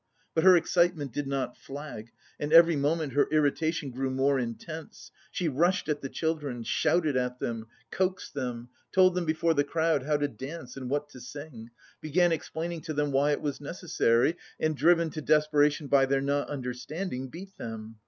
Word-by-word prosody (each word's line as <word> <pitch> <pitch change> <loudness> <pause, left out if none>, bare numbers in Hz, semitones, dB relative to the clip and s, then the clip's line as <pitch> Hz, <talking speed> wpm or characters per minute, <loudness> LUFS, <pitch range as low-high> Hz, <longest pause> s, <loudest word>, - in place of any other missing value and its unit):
But 160 - +1
her 185 -1 +8
excitement 170 -4 +1
did 145 -1 -3
not 135 -3 -2
flag, 140 -5 -8 0.3
and 145 +1 -3
every 165 0 +8
moment 150 0 0
her 145 - +3
irritation 155 0 +1
grew 130 +2 -2
more 135 +1 +2
intense. 155 +7 -7 0.2
She 175 - -2
rushed 170 +5 +1
at 150 -1 -1
the 135 - -5
children, 150 -7 -2
shouted 155 +3 +1
at 125 0 -1
them, 115 -1 -4 0.2
coaxed 185 0 -1
them, 125 -3 -4 0.2
told 185 -1 +5
them 180 -1 -1
before 160 +1 +2
the 145 -2 +2
crowd 160 0 +1
how 150 +3 +1
to 145 0 0
dance 135 +2 -8
and 130 -2 -6
what 145 +1 -1
to 130 - -12
sing, 145 -6 -9 0.3
began 175 +3 +2
explaining 165 +1 -3
to 155 - -5
them 145 0 0
why 140 +2 +3
it - - -2
was 145 -1 -3
necessary, 150 -3 +1 0.2
and 155 0 +1
driven 165 +3 +3
to 155 - -5
desperation 150 0 +3
by 135 -1 +4
their 135 0 +2
not 140 +1 0
understanding, 130 +2 -4
beat 190 +8 -10
them.... 110 -1 -7
145 Hz, 180 wpm, -28 LUFS, 135-165 Hz, 0.3 s, her